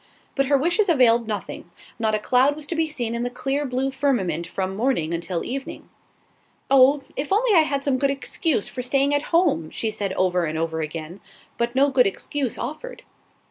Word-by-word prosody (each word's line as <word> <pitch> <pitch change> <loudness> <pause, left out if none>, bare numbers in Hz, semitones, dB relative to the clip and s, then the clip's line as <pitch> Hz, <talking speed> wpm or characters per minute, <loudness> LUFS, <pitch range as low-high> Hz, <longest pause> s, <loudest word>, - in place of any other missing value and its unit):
But 275 -1 0
her 280 0 +4
wishes 350 +8 +1
availed 240 -7 +4
nothing; 205 -4 -5 0.3
not 220 -1 +1
a - - -1
cloud 255 +6 +3
was 305 -1 -8
to 335 - -4
be 320 0 +1
seen 240 -7 -3
in 235 - -2
the 245 - -1
clear 275 +3 -2
blue 260 +2 -1
firmament 200 - -1
from 190 +2 -3
morning 215 -8 0
until 170 +1 -3
evening. 270 +2 -6 0.8
"Oh, 275 +1 +5
if 280 +4 -4
I - - +5
only 450 +1 +2
had 280 -2 -2
some 270 -2 +1
good 275 - +2
excuse 275 - -1
for 255 - -5
staying 275 +3 +1
at 290 - +2
home!" 330 - +2
she 220 - -3
said 200 -2 -3
over 180 -2 +1
and 155 0 -3
over 160 0 -2
again; 160 +3 -5 0.4
but 235 +1 -2
no 275 +1 +3
good 255 -4 +4
excuse 255 +5 -3
offered. 310 - -6
255 Hz, 195 wpm, -23 LUFS, 200-280 Hz, 0.8 s, Oh